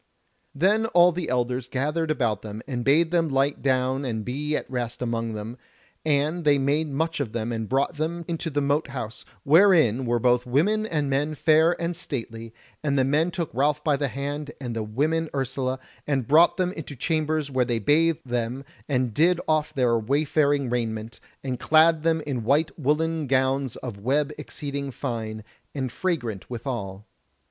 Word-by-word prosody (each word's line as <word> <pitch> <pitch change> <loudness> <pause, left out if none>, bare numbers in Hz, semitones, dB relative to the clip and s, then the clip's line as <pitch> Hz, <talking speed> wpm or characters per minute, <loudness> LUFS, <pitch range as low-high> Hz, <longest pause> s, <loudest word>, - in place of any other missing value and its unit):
Then 205 +9 +2
all 175 -3 +5
the 175 +1 -4
elders 125 0 -1
gathered 150 +5 -1
about 115 -9 0
them, 110 0 -7
and 125 -4 -3
bade 160 +6 +3
them 165 -2 +2
light 135 +1 +1
down 130 0 +1
and 110 -5 -3
be 150 +4 -2
at - - -3
rest 120 -2 -4
amongst 115 -2 -2
them, 110 +4 -7 0.4
and 155 +3 +1
they 145 -2 +4
made 145 +3 +1
much 160 +3 -1
of 125 -7 -3
them 115 0 -2
and 110 -2 -3
brought 140 +4 0
them 165 +2 -3
into 165 -1 -3
the 145 -1 -1
Mote 145 +3 +1
house, 125 -4 -6 0.2
where 180 +7 +6
in 125 -5 +2
were 120 0 +2
both 125 +1 +2
women 205 - +2
and 150 -7 -1
men 145 +3 0
fair 160 +3 +3
and 170 +1 -2
stately, 115 -8 -6 0.3
and 140 -2 +1
the 130 - +4
men 150 +6 +2
took 170 -3 -4
Ralph 145 +4 +1
by 150 -2 +2
the 140 0 -1
hand 140 +4 -4
and 120 -4 -5
the 115 - -1
women 150 +9 -1
Ursula, 130 -1 -1 0.3
and 135 -5 0
brought 160 +4 +5
them 180 -1 +1
into 155 -5 -8
chambers 155 0 -1
where 130 -1 +2
they 120 -1 -1
bathed 155 +8 +2
them 120 +2 -3 0.2
and 125 -4 0
did 170 +7 +3
off 155 -1 +1
their 120 -3 +2
wayfaring 140 +2 +1
raiment, 110 -2 -3 0.2
and 130 -3 -3
clad 160 +2 +4
them 165 0 +1
in 135 -6 -3
white 145 +6 +2
woollen 155 +1 0
gowns 130 0 +1
of 115 -6 -7
web 140 +7 0
exceeding 140 -1 -5
fine, 115 -5 -4 0.3
and 130 -3 -2
fragrant 120 - -3
withal. 115 -5 -5
140 Hz, 180 wpm, -25 LUFS, 125-155 Hz, 0.4 s, where